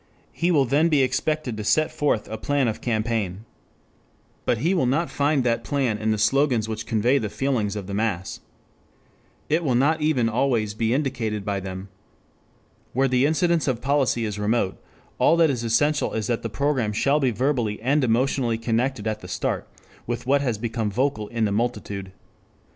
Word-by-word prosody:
He 170 - -1
will 145 -6 +4
then 145 +6 +3
be 145 -4 +4
expected 135 0 -1
to 105 - -4
set 155 +8 +2
forth 145 -7 0
a 110 - -5
plan 135 +4 0
of 110 - -3
campaign. 110 -4 -2 1.0
But 120 - +2
he 165 - +1
will 170 -9 +2
not 155 +7 0
find 145 -1 +1
that 115 -1 0
plan 130 -6 0
in 110 0 -1
the 110 - +1
slogans 120 +1 +2
which 110 0 -5
convey 120 +5 +2
the 105 - -3
feelings 105 -2 -1
of 100 -2 -5
the 100 - -6
mass. 100 -3 -2 1.1
It 160 +3 +1
will 130 -6 +1
not 150 +5 +2
even 145 -7 +2
always 115 -3 0
be 110 +1 -1
indicated 120 -7 -1
by 100 -1 -1
them. 95 0 -7 1.1
Where 135 +2 +2
the 130 +2 +3
incidence 170 0 +1
of 125 -4 0
policy 135 -4 +1
is 105 -1 -4
remote, 105 -2 0 0.4
all 165 - +4
that 165 -3 +4
is 120 -3 -3
essential 145 +7 +1
is 110 -1 -2
that 115 +1 -1
the 115 - -4
program 130 -2 0
shall 140 +7 +2
be 135 -3 +2
verbally 120 -3 0
and 140 +5 +1
emotionally 120 0 +1
connected 115 0 -1
at 110 -1 -2
the - - -10
start - - -2 0.4
with 120 +1 -3
what 140 +2 +3
has 120 -6 -1
become 115 -1 -2
vocal 120 -1 -1
in 115 0 -1
the 105 - 0
multitude. 105 -3 -2
120 Hz, 185 wpm, -24 LUFS, 110-140 Hz, 1.1 s, will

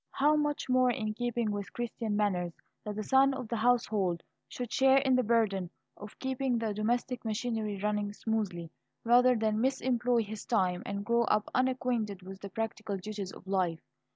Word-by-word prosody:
How 295 +2 +3
much 295 -1 0
more 255 0 +4
in 220 -4 -1
keeping 240 -1 -1
with 205 -1 -4
Christian 230 -2 -3
manners 180 -5 0 0.3
that 210 -1 -5
the 215 - -3
son 270 +3 +4
of 255 -3 -5
the 235 - -1
household 215 -7 +1 0.2
should 245 -3 -6
share 265 0 +5
in 265 -1 +3
the 255 - +4
burden 210 -6 +1 0.3
of 210 +1 -11
keeping 265 -1 -1
the 225 -2 -1
domestic 240 +4 -1
machinery 220 -2 -2
running 210 -1 0
smoothly, 205 -6 -3 0.3
rather 245 +2 +5
than 215 -1 +1
misemploy 245 -3 +1
his 210 +1 -7
time, 185 -5 +1
and 200 0 -4
grow 235 +1 +3
up 210 -2 +1
unacquainted 250 -6 0
with 190 +1 -9
the 200 - -6
practical 215 -1 -3
duties 200 0 -5
of - - -13
life! 185 -4 0
220 Hz, 175 wpm, -31 LUFS, 205-245 Hz, 0.3 s, share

